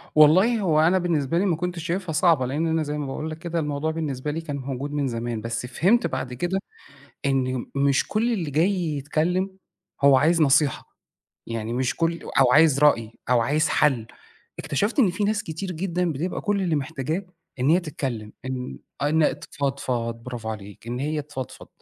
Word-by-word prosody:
والله، 185 +10 +6
هو 160 -6 +2
أنا 170 +4 +4
بالنسبة 165 -3 0
لي، 195 - +2
ما 175 -4 +2
كنتش 175 -1 -4
شايفها 175 0 -2
صعبة، 160 -5 +3
لأن 150 +6 -1
أنا 160 -1 +1
زي 150 0 -3
ما 145 - -3
باقول 155 +4 -4
لَك 155 - -6
كده، 170 0 -3
الموضوع 150 +1 -1
بالنسبة 150 -3 -3
لي 165 +2 -3
كان 145 -3 -5
موجود 135 +1 -4
من 145 -2 0
زمان. 115 -2 -3
بس 115 +2 -3
فهِمت 190 - +2
بعد 125 -1 -4
كده 175 +9 -1 0.7
إنه 130 -2 0
مش 140 0 +2
كل 230 +3 +1
اللي 170 -9 -2
جاي 165 +8 +3 0.2
يتكلَّم، 175 +7 0 0.5
هو 140 -1 +7
عايز 165 +4 +3
نصيحة، 145 0 +2 0.5
يعني 115 0 -4
مش 130 +1 -1
كُل 165 0 0 0.2
أو 125 -2 +5
عايز 150 -3 +6
رأي، 115 -7 +4 0.2
أو 120 -2 +5
عايز 150 +7 +2
حل. 130 -7 +2 0.5
اكتشفت 185 - -1
إن 210 -9 +5
في 205 +3 -2
ناس 210 0 +1
كتير 180 +4 -5
جدًا، 175 0 -1
بتبقى 165 +7 -3
كل 205 -2 0
اللي 165 -4 +1
محتاجاه 155 +5 -3 0.3
إن 130 - +2
هي 175 - +5
تتكلَّم، 130 -10 -5
إن 130 -1 -5 0.2
إن 155 +1 +2
تفضفِض. 130 -5 -2
برافو 120 -3 -6
عليك، 105 0 -8
إن 120 +1 -3
هي 150 +2 -1
تفضفِض. 135 -3 -8
150 Hz, 180 wpm, -24 LUFS, 130-170 Hz, 0.7 s, هو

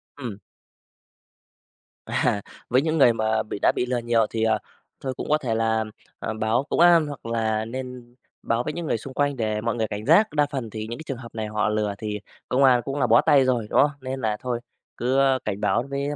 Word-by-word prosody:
Ừm. 120 -8 -6 1.7
À, 100 - 0 0.3
với 130 +2 +4
những 160 +1 0
người 120 -5 +6
mà 110 0 0
bị 105 - -6
đã - - +4
bị 125 - -1
lừa 125 0 -1
nhiều 115 -1 +2
thì, 110 -1 -2
ờ, 110 -1 +2 0.4
thôi 130 -1 -3
cũng - - -5
có 150 - +4
thể 120 -6 -2
là, 110 0 +1 0.4
ờm, 110 -1 -4
báo 110 +4 +1
công - - 0
an 170 -3 +6
hoặc 145 -5 -8
là 110 -1 0
nên 125 0 -7 0.3
báo 115 +1 0
với 150 - -3
những 170 -1 -4
người 115 - 0
xung 130 +4 -9
quanh 145 0 +1
để 110 -3 -1
mọi 115 +1 -1
người 110 -2 -1
cảnh 105 +1 -5
giác, 175 +8 +5
đa 150 -1 +3
phần 130 -6 -4
thì 110 0 -6
những 120 +4 -6
cái - - -7
trường 135 - -3
hợp 115 -2 -11
này 110 -1 -3
họ 105 0 0
lừa 105 -1 0
thì 105 -1 -4 0.3
công 130 +2 +3
an 125 -2 +5
cũng 140 +1 -3
là 125 - +2
bó 115 +2 +6
tay 135 -2 +5
rồi, 120 -4 0
đúng - - +4
không? 145 - +3
Nên 130 0 -4
là 105 -2 0
thôi 125 -2 -2 0.4
cứ 130 +3 +1 0.3
cảnh 105 -1 -3
báo 115 +3 +2
với 140 +1 -2
120 Hz, 235 wpm, -24 LUFS, 110-135 Hz, 1.7 s, người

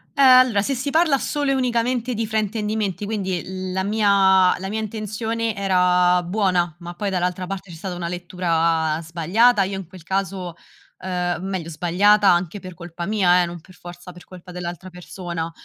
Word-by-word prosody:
Eh 280 - +1
allora, 255 -5 +6
se 275 - -1
si 260 +3 -3
parla 315 -1 +3
solo 290 0 -1
e - - +3
unicamente 250 -1 0
di 225 +1 -1
fraintendimenti, 215 -2 -2
quindi 190 -4 -3 0.3
la 190 +1 -1
mia 195 -3 +4
la 190 - -6
mia 215 +2 -2
intenzione 220 +1 -3
era 180 -2 +3
buona, 180 -3 0
ma 175 0 -9
poi 200 +2 -3
dall'altra 180 0 -1
parte 195 0 -6
c'è 170 - -9
stata 185 +2 -5
una 175 -1 -4
lettura 165 -3 0
sbagliata, 190 +8 +2
io 195 +1 -3
in 195 - -7
quel 185 0 -13
caso, 190 -1 -3 0.4
ehm 180 -1 -2
meglio 185 -4 -4
sbagliata 190 +6 +3
anche 175 +2 +1
per 185 -2 -10
colpa 170 +1 -7
mia 180 -3 +3
eh, - - 0
non 170 -1 -8
per 185 +1 -18
forza 175 +1 -11
per 180 0 -14
colpa 180 0 -13
dell'altra 175 +1 -7
persona, 175 -2 -6
185 Hz, 175 wpm, -22 LUFS, 175-210 Hz, 0.4 s, allora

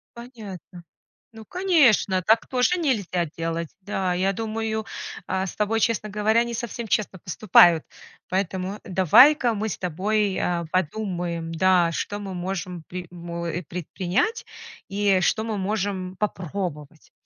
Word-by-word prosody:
Понятно. 215 -7 -10 0.5
Ну, 220 -1 -11
конечно, 290 - +3
так 220 +5 +3
тоже 255 +8 +2
нельзя 205 - 0
делать. 165 -1 -2
Да, 190 -2 -1
я 190 +2 +1
думаю, 220 +1 -3 0.4
э, 190 0 -1
с 185 - -7
тобой, 215 +1 0
честно 220 -1 0
говоря, 215 +3 +2
не 235 0 -5
совсем 235 0 -5
честно 200 -2 -1
поступают. 175 -2 +5 0.5
Поэтому 190 +1 -2
давай-ка 230 - +5
мы 220 +1 -2
с - - -4
тобой, 195 +3 0
э, 170 -2 -1
подумаем, 175 -2 -2
да, 175 0 +3
что 205 +5 -3
мы 195 -2 -6
можем 180 -1 -4
при 180 0 -6
мо 170 -1 -6
э, 170 +1 -3
предпринять 180 - -2 0.4
и 200 -1 +2
что 215 +5 +1
мы 220 -2 -3
можем 190 -2 -2
попробовать. 175 -6 -4
190 Hz, 135 wpm, -24 LUFS, 180-220 Hz, 0.5 s, поступают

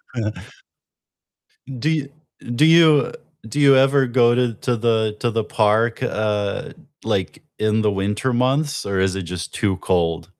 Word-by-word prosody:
Yeah. 110 -3 -2 1.5
Do 150 - -1
ya 150 -3 -1 0.5
do 150 - +4
you 160 -4 +5 0.4
do 145 +5 -3
you 140 -1 +6
ever 135 0 +3
go 120 -1 +3
to 125 -2 0
to 120 +3 -2
the 110 -2 0
to 120 - 0
the 115 -1 -2
park, 110 +3 +1
uh, 105 -4 -2 0.3
like, - - -3 0.2
in 110 0 +1
the 105 - +2
winter 105 +5 -2
months 135 +3 0
or 100 -1 -2
is 95 0 +1
it 95 - -3
just 85 -3 -7
too 105 -5 -1
cold? 85 -3 -1
115 Hz, 155 wpm, -20 LUFS, 105-130 Hz, 1.5 s, you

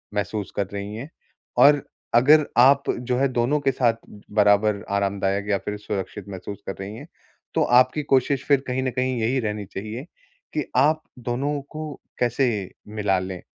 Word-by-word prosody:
महसूस 105 0 -2
कर 100 - 0
रही 100 +1 -5
हैं। 125 +7 -7 0.5
और 145 -1 +7 0.3
अगर 145 +5 +6
आप 135 +3 +6 0.2
जो 125 0 -1
है 135 +2 +3
दोनों 125 +5 +2
के 135 - +2
साथ 120 -3 +2 0.4
बराबर 105 0 +3
आरामदायक 100 0 0
या 100 - +3
फिर 105 0 -3
सुरक्षित 105 -2 -5
महसूस 95 +1 -7
कर 95 - -3
रही 100 +2 -6
हैं, - - -10 0.5
तो - - +3
आपकी 130 +4 +4
कोशिश 135 0 +2
फिर 140 -2 +3
कहीं 130 +1 -1
न 130 - 0
कहीं 125 0 -1
यही 125 +4 +1
रहनी 105 -3 -3
चाहिए, 110 +7 -6 0.5
कि 150 - -1
आप 155 +4 +4 0.2
दोनों 130 +5 -2
को 155 -1 -6 0.3
कैसे 120 -5 0 0.2
मिला 105 -3 0
लें। 95 -1 -6
120 Hz, 170 wpm, -24 LUFS, 100-135 Hz, 0.5 s, और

